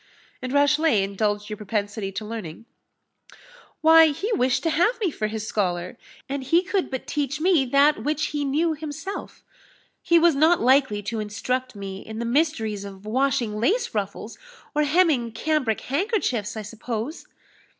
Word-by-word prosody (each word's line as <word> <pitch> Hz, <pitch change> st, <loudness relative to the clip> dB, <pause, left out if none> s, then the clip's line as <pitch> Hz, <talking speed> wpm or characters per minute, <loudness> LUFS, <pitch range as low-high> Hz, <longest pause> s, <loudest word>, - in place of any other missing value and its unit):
"And 255 Hz, 0 st, -4 dB
Rashleigh 285 Hz, -5 st, +3 dB
indulged 205 Hz, +1 st, -1 dB
your 210 Hz, -1 st, -6 dB
propensity 205 Hz, -1 st, -3 dB
to 215 Hz, -, -5 dB
learning?" 215 Hz, -3 st, -7 dB, 1.2 s
"Why, 325 Hz, 0 st, +8 dB
he 390 Hz, +10 st, -2 dB
wished 250 Hz, -, +1 dB
to 325 Hz, -, +1 dB
have 360 Hz, +11 st, +2 dB
me 390 Hz, -7 st, 0 dB
for 215 Hz, -6 st, -2 dB
his 215 Hz, 0 st, -5 dB
scholar, 180 Hz, -1 st, -2 dB, 0.3 s
and 275 Hz, 0 st, -3 dB
he 335 Hz, +7 st, +3 dB
could 385 Hz, 0 st, -1 dB
but 260 Hz, -2 st, -5 dB
teach 290 Hz, 0 st, -2 dB
me 330 Hz, -4 st, +3 dB
that 280 Hz, +4 st, +3 dB
which 305 Hz, +1 st, 0 dB
he 295 Hz, -1 st, -1 dB
knew 310 Hz, +4 st, +1 dB
himself 315 Hz, +5 st, -7 dB, 0.6 s
he 340 Hz, -, +4 dB
was 335 Hz, 0 st, +5 dB
not 315 Hz, +5 st, +4 dB
likely 255 Hz, -5 st, +3 dB
to 225 Hz, +2 st, -3 dB
instruct 250 Hz, +4 st, -3 dB
me 195 Hz, -1 st, -6 dB
in 220 Hz, +2 st, -9 dB
the 235 Hz, -, -3 dB
mysteries 235 Hz, -6 st, 0 dB
of 195 Hz, 0 st, -10 dB
washing 240 Hz, -2 st, 0 dB
lace 410 Hz, -, +1 dB
ruffles, 205 Hz, +1 st, -4 dB, 0.3 s
or 300 Hz, -, +2 dB
hemming 290 Hz, -8 st, +2 dB
cambric 260 Hz, -2 st, 0 dB
handkerchiefs, 270 Hz, -, -1 dB
I 215 Hz, -, -4 dB
suppose." 230 Hz, -, -5 dB
255 Hz, 160 wpm, -24 LUFS, 215-310 Hz, 1.2 s, Why